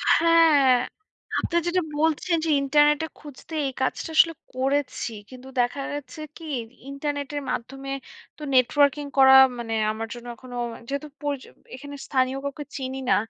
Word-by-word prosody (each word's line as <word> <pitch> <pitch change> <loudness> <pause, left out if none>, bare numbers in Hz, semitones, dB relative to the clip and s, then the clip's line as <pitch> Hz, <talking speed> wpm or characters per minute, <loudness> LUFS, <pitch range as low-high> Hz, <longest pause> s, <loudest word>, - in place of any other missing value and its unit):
হ্যাঁ, 325 -5 +5 0.7
আপনি 340 - -1
যেটা 365 +1 +2 0.2
বলছেন 320 +2 +1
যে 320 - -1
ইন্টারনেটে 295 +2 +3
খুঁজতে 295 +2 -12
এই 265 - -4
কাজটা 260 - -1
আসলে 330 0 +6 0.2
করেছি। 270 -1 -1 0.2
কিন্তু 255 0 -12
দেখা 245 +3 +1
গেছে 290 -1 -7 0.2
কী 330 - -11 0.4
ইন্টারনেটের 285 0 -3
মাধ্যমে 270 +3 -5 0.5
তো - - -16
নেটওয়ার্কিং 285 +3 +3
করা 265 0 +8 0.3
মানে 225 -1 -4 0.2
আমার 225 +1 -5
জন্য 240 0 -10
এখনো 245 +1 -10 0.3
যেহেতু 280 +2 -4
পরিচ 290 -2 -2 0.3
এখানে 285 +2 -9
স্থানীয় 260 0 +1
কাউকে 280 +1 -4
চিনি 265 0 -4
না। - - +5
280 Hz, 140 wpm, -25 LUFS, 260-295 Hz, 0.7 s, করা